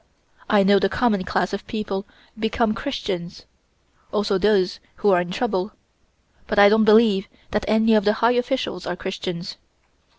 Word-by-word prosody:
I 205 -2 +4
know 200 0 +4
the 195 - +1
common 210 -3 0
class 180 +2 -1
of 200 - -5
people 205 -2 -4 0.3
become 220 0 0
Christians 190 -9 -5 0.7
also 205 -2 0
those 195 -2 +1 0.2
who 205 - +1
are 180 -2 +4
in 175 - -6
trouble 195 -1 -2 0.7
but 210 - -3
I 205 0 +8
don't 220 +1 +3
believe 215 -2 +4 0.2
that 210 - -1
any 220 +1 +3
of 215 -1 +4
the 210 +1 +3
high 230 +2 +2
officials 245 -7 -2
are - - -3
Christians." 185 -1 -6
205 Hz, 160 wpm, -22 LUFS, 190-220 Hz, 0.7 s, I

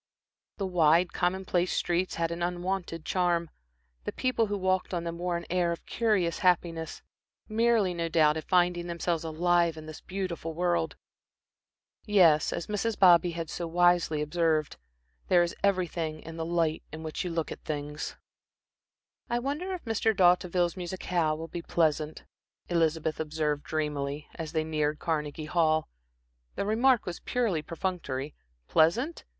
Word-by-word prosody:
The 195 - -2
wide, 170 -1 +3
commonplace 180 0 0
streets 175 +1 0
had 165 0 -1
an 170 +1 -4
unwonted 175 -1 -2
charm, 175 -2 +1 0.5
the - - -3
people 255 -3 0
who 205 0 -2
walked 185 -1 0
on 170 - -2
them 170 0 -5
wore 175 -1 -1
an 170 - -7
air 175 -1 +1
of 170 - -6
curious 205 -7 +1
happiness, 170 -3 0 0.4
merely, 220 -4 +2
no 170 -1 -2
doubt, 155 -2 +4
at 160 - -6
finding 175 -1 +2
themselves 170 -1 -1
alive 170 +1 +2
in 155 - -8
this 155 -1 -9
beautiful 185 -4 -4
world. 175 -2 0 1.1
Yes, 175 -8 +4
as 170 - -3
Mrs. 210 +1 -2
Bobby 175 -2 +6
had 165 -1 -4
so 170 +2 -4
wisely 175 -3 +3
observed, 155 -1 0 0.5
"there 175 -1 +5
is 170 - -3
everything 175 -5 0
in 165 0 -9
the 165 0 -3
light 165 -2 +1
in 160 +1 -7
which 155 -1 -3
you 180 - -3
look 165 -2 -2
at - - -7
things." 150 -1 -4 1.1
"I 240 - +1
wonder 290 +9 -3
if 355 - -10
Mr. 225 -1 +1
D'Hauteville's 180 -1 +3
musicale 175 -3 -1
will 165 +1 -6
be 170 - -6
pleasant," 155 -2 0 0.5
Elizabeth 160 -2 +1
observed 150 -1 -1
dreamily, 150 -2 -2
as 160 -1 -6
they 160 -1 +1
neared 155 -1 -1
Carnegie 155 -1 -2
Hall. 155 -1 +2 0.7
The - - -2
remark 235 +3 +3
was 175 -2 -5
purely 225 -10 0
perfunctory. 155 -4 -4 0.3
Pleasant? 235 - +2
170 Hz, 150 wpm, -29 LUFS, 160-185 Hz, 1.1 s, Bobby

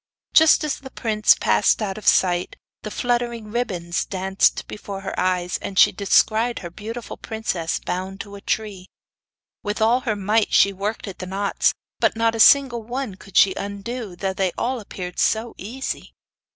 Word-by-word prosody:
Just 320 0 +6
as 300 -2 -2
the 265 - -10
prince 215 -4 +3
passed - - +3
out 200 -3 -2
of 215 - -8
sight 180 -1 +3 0.3
the 215 - -6
fluttering 235 -2 -2
ribbons 180 -8 -2
dance 190 0 +2
before 200 -2 -8
her 195 - -5
eyes, 180 -1 0
and 195 - -6
she - - +7
descried 220 +4 +2
her 170 - -6
beautiful 225 +5 -7
princess 205 -7 -3
bound 190 +2 -4
to 200 - -11
a 200 - -9
tree. 200 -4 -3 0.7
With 205 +2 -3
all 230 +3 +3
her 230 -4 -2
might 205 +2 +1
she 200 - +5
worked 205 +3 -4
at 195 - -8
the 185 - -6
knots, 195 +2 +1 0.3
but - - +2
not 230 0 +2
a 225 - -4
single 255 -1 +6
one 240 0 -4
could 195 +1 -7
she 190 - +6
undo, 200 +1 -6
though 190 +1 -2 0.2
all 255 +1 -1
appeared 180 -4 -7
so 225 +1 +1
easy. 250 +8 -6
210 Hz, 170 wpm, -22 LUFS, 190-230 Hz, 0.7 s, she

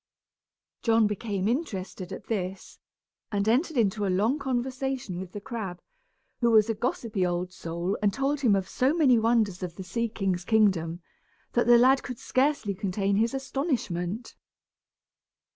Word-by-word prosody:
John 225 -1 +4
became 205 -2 -2
interested 195 - -3
at 190 - -7
this, 190 -3 -4 0.5
and 200 0 0
entered 275 +7 +2
into 210 -2 +2
a 200 - +1
long 215 +10 +1
conversation 260 -6 -2
with 185 -1 -7
the 205 - -6
crab, 205 -5 -5 0.6
who 235 - +3
was 220 0 +5
a - - 0
gossipy 225 -2 -2
old 180 0 -1
soul 170 +2 -3
and 205 -1 +3
told 275 +5 -1
him 235 -7 +4
of 190 -1 -1
so 265 +5 +1
many 265 -8 +5
wonders 220 -5 +1
of 175 -2 -5
the 190 - -7
sea 230 +6 -2
king's 190 -4 -1
kingdom 180 -6 +2 0.5
that 240 - +1
the 240 0 +8
lad 260 +3 +5
could 250 - -6
scarcely 260 -6 0
contain 195 0 -1
his 230 +4 +1
astonishment. 245 - -3
215 Hz, 155 wpm, -27 LUFS, 190-245 Hz, 0.6 s, the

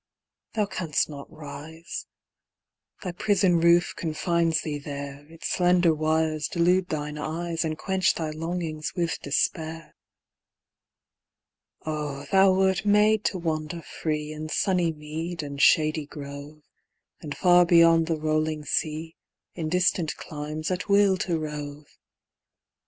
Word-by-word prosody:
Thou 210 -2 +2
canst 170 -7 -1
not 140 -1 -9
rise: 155 +3 -8 1.0
Thy 180 - -3
prison 185 -1 +2
roof 170 +1 +4
confines 165 0 0
thee 150 -2 -4
there; 140 0 -7
Its 165 0 -6
slender 180 -2 +3
wires 155 0 0
delude 180 +2 +2
thine 150 -1 -3
eyes, 165 +2 -2
And 155 -1 -2
quench 190 +2 +1
thy 160 -2 -3
longings 160 -1 -4
with 170 -4 -1
despair. 160 +3 -2 1.9
Oh, 150 -3 -4
thou 195 -1 +6
wert 190 0 +2
made 210 +1 +4
to 190 - 0
wander 160 -1 -3
free 150 -1 -3
In 155 0 -6
sunny 180 -1 +1
mead 160 +2 -5
and 140 -1 -5
shady 155 -1 +4
grove, 145 +1 -9 0.6
And 145 -2 -6
far 180 -1 +6
beyond 165 -1 +5
the 165 -2 -1
rolling 155 0 -1
sea, 160 +2 -2 0.4
In 160 -3 -3
distant 180 -2 +1
climes, 155 +2 -5
at 180 +3 -3
will 200 -1 +5
to 175 -2 -1
rove! 150 -1 -6
160 Hz, 125 wpm, -26 LUFS, 150-175 Hz, 1.9 s, thou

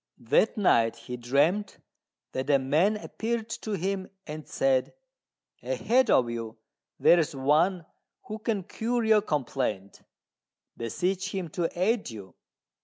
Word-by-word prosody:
That 125 - +2
night 115 - +3
he 125 - -7
dreamt 145 - +1 0.5
that 130 +2 -3
a 140 - +6
man 155 +11 +2
appeared 225 +1 -3
to 215 - -4
him 190 0 -2 0.2
and 155 0 -7
said, 135 -1 +1 0.7
"Ahead 260 - +1
of 125 - +4
you 115 -1 -5 0.4
there 175 - +6
is 150 -3 -1
one 160 +6 +2 0.4
who 220 -3 -7
can 215 -3 -1
cure 235 +5 -2
your 220 -1 +5
complaint: 125 - -3 0.7
beseech 180 - -2
him 185 -4 -3
to 165 +2 -1
aid 210 - +1
you." 100 -5 -10
170 Hz, 130 wpm, -27 LUFS, 130-210 Hz, 0.7 s, a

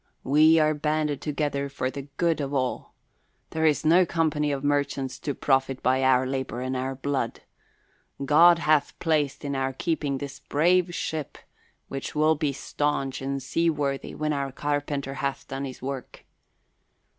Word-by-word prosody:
"We 155 +4 +5
are 155 -1 +4
banded 150 -1 -1
together 145 -2 -2
for 130 -2 -2
the 140 0 -7
good 170 -3 +1
of 140 0 -3
all. 130 -2 -2 0.6
There 160 0 +2
is 150 0 +1
no 170 +4 +6
company 155 -4 0
of 140 -1 -3
merchants 140 -2 -1
to 145 - -3
profit 135 -1 +1
by 130 +1 +2
our 130 -1 +4
labour 130 -3 -3
and 130 +1 -2
our 130 +1 -2
blood. 135 -3 -2 0.8
God 165 +4 +7
hath 155 -3 +2
placed 150 -4 0
in 140 -1 -2
our 135 0 -1
keeping 145 -1 -1
this 140 0 -7
brave 175 +3 +2
ship, 155 -3 -4 0.5
which 135 +3 -6
will 155 +1 +4
be 150 -2 -1
staunch 140 -1 -2
and 135 0 -3
sea 165 +5 +1
worthy 140 -3 -2
when 155 0 -1
our 140 -1 -2
carpenter 145 0 -2
hath 140 0 -3
done 135 +1 -4
his 130 -1 -9
work. 135 -1 -6
145 Hz, 160 wpm, -26 LUFS, 135-155 Hz, 0.8 s, God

